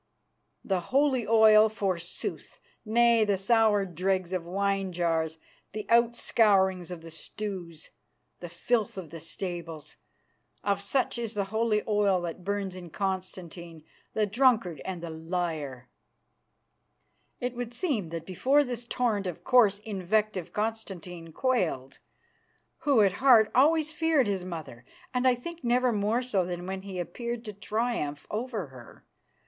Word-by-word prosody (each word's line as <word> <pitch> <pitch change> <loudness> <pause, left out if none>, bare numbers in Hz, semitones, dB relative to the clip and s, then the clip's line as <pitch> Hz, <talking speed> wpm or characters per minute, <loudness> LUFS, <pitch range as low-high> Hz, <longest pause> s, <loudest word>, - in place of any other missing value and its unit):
The 190 -2 +1
holy 260 +4 +1
oil 220 -1 +7
forsooth! 185 -5 -4 0.2
Nay, 235 0 +4
the 205 -2 +1
sour 210 0 +3
dregs 185 +1 -1
of 180 -2 -1
wine 195 +1 0
jars, 165 -2 0 0.4
the 215 0 -5
outscourings 210 -6 +3
of 175 -2 -7
the 165 - -10
stews, 175 -2 -7 0.5
the 175 - -7
filth 215 +5 -1
of 170 -5 -7
the 165 - -7
stables, 165 -2 -6 0.7
of 200 0 0
such 245 +4 0
is 230 -2 -4
the 200 - +1
holy 220 -1 +1
oil 205 -3 +3
that 175 +1 -5
burns 200 -1 -2
in 180 -2 -9
Constantine, 180 -3 -5 0.3
the 215 - +2
drunkard 215 - +2
and 180 -3 -5
the 170 - -5
liar." 160 -6 -4 1.5
It 250 0 -2
would 240 -1 -4
seem 240 - -2
that 165 0 -6
before 265 - +3
this 245 -3 -5
torrent 225 -6 0
of 175 - -6
coarse 225 -6 +5
invective 205 -2 -1
Constantine 190 -6 -4
quailed, 165 - -1 0.8
who 275 -6 +3
at 195 - +4
heart 235 -5 +6
always 310 +3 +4
feared 315 -4 +2
his 195 -3 -1
mother, 160 -9 -7 0.3
and 250 +1 +2
I 250 - +5
think 340 +7 -9
never 245 +1 +2
more 215 +4 +1
so 205 -7 +1
than 175 0 -5
when 190 0 -4
he 195 -1 -7
appeared 235 +6 -4
to 210 - -6
triumph 205 -8 -2
over 220 -3 -3
her. 125 -3 -14
200 Hz, 140 wpm, -28 LUFS, 175-235 Hz, 1.5 s, oil